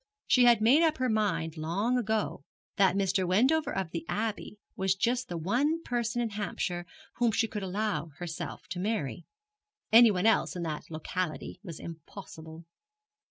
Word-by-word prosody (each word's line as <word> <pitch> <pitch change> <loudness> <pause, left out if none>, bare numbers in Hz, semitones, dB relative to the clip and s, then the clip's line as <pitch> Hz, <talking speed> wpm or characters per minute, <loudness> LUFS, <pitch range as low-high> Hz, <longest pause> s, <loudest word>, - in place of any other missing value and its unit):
She 250 -1 +5
had 235 -3 +6
made 255 +8 +5
up 320 -2 +3
her 255 -1 0
mind 200 -7 0
long 190 +10 0
ago 220 - -1 0.3
that 195 -1 +4
Mr. 195 -1 +1
Wendover 260 - +3
of 190 -4 -3
the 165 - -4
Abbey 215 -1 -3 0.2
was 190 0 +1
just 245 +5 0
the 175 - -3
one 275 - 0
person 240 0 -1
in 225 - -3
Hampshire 180 -4 -3 0.3
whom 240 -1 +3
she 225 +1 +1
could 210 -2 -5
allow 200 -1 -2
herself 170 -1 -6
to 180 -1 -4
marry. 180 - -2 0.7
Anyone 220 -4 +6
else 225 - +3
in 175 - -3
that 155 -2 -5
locality 165 +2 -4
was 170 -7 -8
impossible. 160 -1 -10
200 Hz, 160 wpm, -29 LUFS, 175-230 Hz, 0.7 s, had